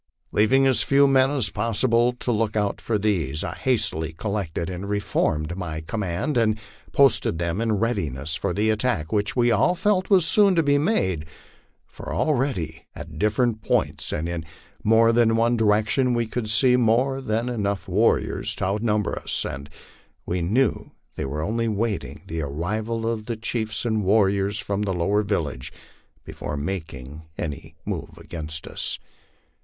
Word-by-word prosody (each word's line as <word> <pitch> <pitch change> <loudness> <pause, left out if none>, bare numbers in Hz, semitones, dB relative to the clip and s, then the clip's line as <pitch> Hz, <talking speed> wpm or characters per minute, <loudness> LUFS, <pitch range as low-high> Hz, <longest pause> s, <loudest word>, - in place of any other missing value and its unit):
Leaving 130 +6 +4
as 130 -2 +4
few 140 0 +4
men 135 -1 +4
as 130 -8 0
possible 115 +3 +2
to 125 0 -3
look 110 -1 0
out 105 -2 0
for 110 - 0
these, 85 -9 0
I - - -3
hastily 105 - 0
collected 90 -2 -3
and 95 +2 -5
reformed 85 -5 0
my 85 -4 -4
command, 105 - -2
and 110 -2 +2 0.3
posted 135 -11 +3
them 85 +4 -1
in 115 -1 +1
readiness 80 - -1
for 100 - -2
the 105 +4 +1
attack 110 -8 -1
which 105 -1 0
we 120 -1 +3
all 145 - +3
felt 190 0 +1
was 190 -5 +5
soon 200 +2 +4
to 165 - +3
be 145 -1 +3
made; 95 - 0 0.6
for - - -9
already 120 - -1
at - - -9
different 110 +2 +1
points - - 0
and 80 +2 -2
in 85 -1 -3 0.4
more 115 +1 +5
than 115 -1 +4
one 115 +1 +3
direction 110 +4 +2
we 120 0 +1
could 110 0 -4
see 125 +3 +4
more 125 +3 +2
than 115 -1 -1
enough 100 -5 -2
warriors 105 +5 +1
to - - -2
outnumber 105 +1 0
us, - - -2
and 70 +2 -6 0.6
we 90 0 -1
knew 115 +11 0 0.2
they - - -3
were 75 +3 -3
only 115 +6 -1
waiting 110 0 -2
the 80 0 -4
arrival 105 +11 -3
of 110 -2 -3
the 115 -2 -3
chiefs 115 0 -2
and 110 -3 0
warriors 100 0 +2
from 100 -4 -2
the 95 -3 -1
lower 100 +5 +2
villages 80 - -2 0.5
before 75 - -5
making 75 -4 -5 0.2
any 75 -3 -5
move - - -5
against 80 -1 -7
us. - - -4
105 Hz, 160 wpm, -24 LUFS, 90-120 Hz, 0.6 s, was